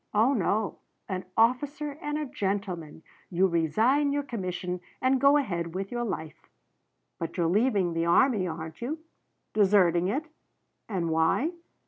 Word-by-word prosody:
Oh 230 +6 +4
no 210 -1 0 0.3
an 185 -2 -4
officer 280 +6 +2
and 295 -1 -2
a 305 - -2
gentleman 190 - -3 0.3
you 185 +1 +3
resign 220 - +2
your 285 0 0
commission 180 -7 -4 0.2
and 260 0 +2
go 280 +1 +6
ahead 170 - -2
with 195 +1 -3
your 240 0 -2
life. 160 -8 -6 0.7
But 165 +3 -4
you're 175 - +2
leaving 195 -1 +2
the 165 0 0
army, 210 +1 +4
aren't 160 +1 -6
you? 275 +7 -2 0.6
Deserting 185 -4 +4
it. 280 +10 -1 0.6
And 175 -5 -1
why? 165 - +2
195 Hz, 140 wpm, -28 LUFS, 170-255 Hz, 0.7 s, go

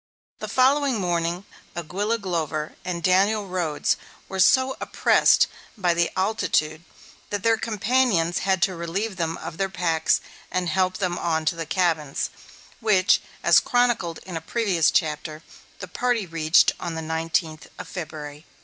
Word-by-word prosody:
The - - -5
following 265 -1 +2
morning 175 0 -1 0.3
Aguilla 200 +7 -2
Glover 160 -5 -3
and 175 -2 -4
Daniel 200 +3 +3
Rhodes 175 -5 -1 0.3
were 190 - -5
so 260 +7 +4
oppressed - - +4 0.3
by 180 -4 +2
the 170 0 +1
altitude 170 -6 0 0.5
that 205 -2 -3
their 230 0 +4
companions 215 -5 +1
had 190 -2 +1
to 190 - +2
relieve 185 +5 -3
them 165 -2 -2
of 160 - -8
their 195 -1 -1
packs 165 -4 +1 0.3
and 180 -1 -1
help 185 +3 +1
them 180 -3 -2
on 160 -2 -1
to 155 - +1
the 165 -1 -5
cabins, 160 -6 0 0.5
which, 200 -5 +3 0.2
as - - +6
chronicled 240 -9 +1
in 185 -2 -7
a 165 - -3
previous 180 -2 +1
chapter, 155 0 -1 0.3
the - - -8
party 245 -5 -1
reached 165 -1 +3
on 170 -2 -4
the 160 - -4
nineteenth 160 0 -2
of - - -8
February, 155 -4 -7
1847. 150 - -20
175 Hz, 150 wpm, -24 LUFS, 165-205 Hz, 0.5 s, as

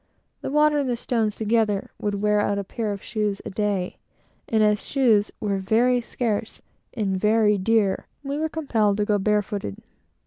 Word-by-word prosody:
The - - -4
water 300 +1 +3
and 275 -3 -1
the 245 - +1
stones 225 -3 -1
together 215 -2 0
would 205 -1 -2
wear 210 0 +3
out 205 -1 +1
a 200 - -2
pair 215 +2 -3
of 200 -1 -6
shoes 210 -2 -2
a - - -5
day, 200 -2 -1 0.5
and 220 -1 +3
as 210 0 +2
shoes 230 -7 +2
were 200 -2 -1
very 240 +6 +2
scarce 225 -2 -3 0.4
and 200 -4 0
very 210 0 +3
dear, 205 -1 +1 0.2
we 280 +1 -3
were 315 0 -1
compelled 225 -11 +1
to 210 - +1
go 205 -1 +2
barefooted. 205 - -1
210 Hz, 175 wpm, -24 LUFS, 205-230 Hz, 0.5 s, water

